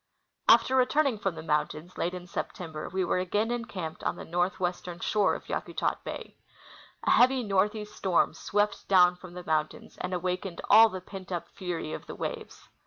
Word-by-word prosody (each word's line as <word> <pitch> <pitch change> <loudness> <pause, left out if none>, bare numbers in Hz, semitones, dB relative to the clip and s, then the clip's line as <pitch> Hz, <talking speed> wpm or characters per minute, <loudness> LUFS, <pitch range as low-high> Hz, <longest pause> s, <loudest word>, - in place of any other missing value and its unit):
After 260 - +6
returning 260 -2 +3
from 195 -4 -1
the 160 - -7
mountains, 155 +2 -1
late 180 +2 -1
in 180 -1 -7
September, 165 -2 -5
we 185 0 0
were 180 - +1
again 205 +5 0
encamped 200 -9 -4
on - - 0
the - - -8
northwestern 175 0 -2
shore 205 +1 +2
of - - -9
Yakutat - - -2
bay. - - -7 0.7
A - - +2
heavy 255 +1 +5
northeast 210 +1 0
storm 185 -3 +2
swept 205 0 -1
down 180 -2 +6
from 180 -1 -12
the 180 - -7
mountains 155 -2 -2
and 185 - -3
awakened 180 0 -2
all 225 +2 +9
the 185 -3 -6
pent 190 0 -10
up 170 -1 -3
fury 175 -4 -4
of - - -7
the - - -7
waves. - - -6
185 Hz, 175 wpm, -29 LUFS, 175-210 Hz, 0.7 s, all